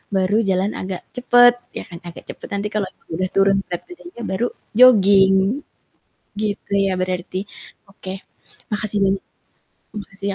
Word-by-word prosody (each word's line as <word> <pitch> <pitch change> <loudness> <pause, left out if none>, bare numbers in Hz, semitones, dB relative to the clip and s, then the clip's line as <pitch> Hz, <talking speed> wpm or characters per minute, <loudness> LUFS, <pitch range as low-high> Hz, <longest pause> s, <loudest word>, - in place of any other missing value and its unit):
baru 190 +2 +2
jalan 190 +2 +1
agak 185 -1 -5
cepet 245 -1 +6 0.2
ya - - -4
kan 170 - -11
agak 170 - -10
cepet, - - -11
nanti 200 +1 -3
kalau 210 -3 -1 0.2
udah 185 +3 -1
turun 195 0 +4
berat 175 - -4
badannya 350 -7 -11
baru 225 +5 -1 0.2
jogging, 200 -5 +6 1.0
gitu 205 -1 -4
ya 195 -2 +2
berarti? 185 +1 -3 0.4
Oke, 190 0 -9 0.5
makasih, 210 0 -1 1.0
makasih 200 -1 -7
195 Hz, 130 wpm, -20 LUFS, 185-215 Hz, 1.0 s, cepet